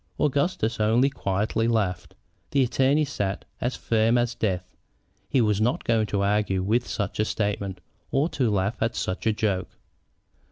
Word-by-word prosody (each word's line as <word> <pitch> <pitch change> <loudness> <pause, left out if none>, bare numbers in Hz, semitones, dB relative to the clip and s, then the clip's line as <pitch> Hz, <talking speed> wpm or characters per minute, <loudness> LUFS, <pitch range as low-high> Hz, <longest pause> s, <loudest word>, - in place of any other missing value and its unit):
Augustus 140 -6 +1
only 115 +6 +3
quietly 110 +1 0
laughed. 90 -7 -1 0.3
The 140 -1 +3
attorney 135 +4 +2
sat 100 -9 -3 0.2
as 125 +2 -1
firm 115 +1 +2
as 120 -1 +1
death. 90 -5 -2 0.5
He 130 - +3
was 105 -2 +2
not 120 +4 +1
going 110 -2 +2
to 100 -1 0
argue 100 -2 +1
with 115 +5 +1
such 105 -1 -3
a - - +4
statement 100 -3 -2 0.3
or 140 +4 +2
to 130 -8 0
laugh 100 +1 -1
at 115 +1 0
such 95 +4 -2
a - - +5
joke. 100 -4 -1
110 Hz, 160 wpm, -25 LUFS, 100-120 Hz, 0.5 s, a